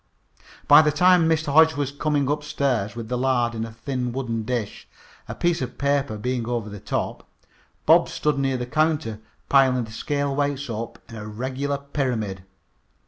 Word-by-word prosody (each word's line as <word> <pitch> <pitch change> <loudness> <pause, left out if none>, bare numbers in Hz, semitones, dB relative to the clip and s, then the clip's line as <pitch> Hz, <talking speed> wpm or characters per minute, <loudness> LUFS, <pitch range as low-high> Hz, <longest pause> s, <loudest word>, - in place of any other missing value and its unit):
By - - +9
this 150 -1 +1
time 180 0 +5
Mr. 160 -3 0
Hodge 160 +1 +6
was 140 -1 -2
coming 145 -1 0
upstairs 140 -7 -1
with 115 -2 -6
the 125 +1 -2
lard 125 -2 +1
in 110 -1 -3
a 115 - -9
thin 125 +2 -3
wooden 120 -3 -3
dish, 110 -2 -4 0.4
a - - -4
piece 175 -3 0
of 125 -1 -5
paper 140 -4 0
being 120 +1 -2
over 115 -4 -3
the 105 - -8
top. - - -4 0.6
Bob - - +5
stood 150 -2 0
near 135 -1 0
the 125 - -3
counter 155 -5 0 0.3
piling 130 -3 +4
the 110 - -9
scale 140 +4 -2
weights 140 -2 -1
up 115 +1 -5
in 115 - -11
a 105 -1 -7
regular 130 +6 -3
pyramid. 125 -9 -3
130 Hz, 175 wpm, -24 LUFS, 115-145 Hz, 0.6 s, By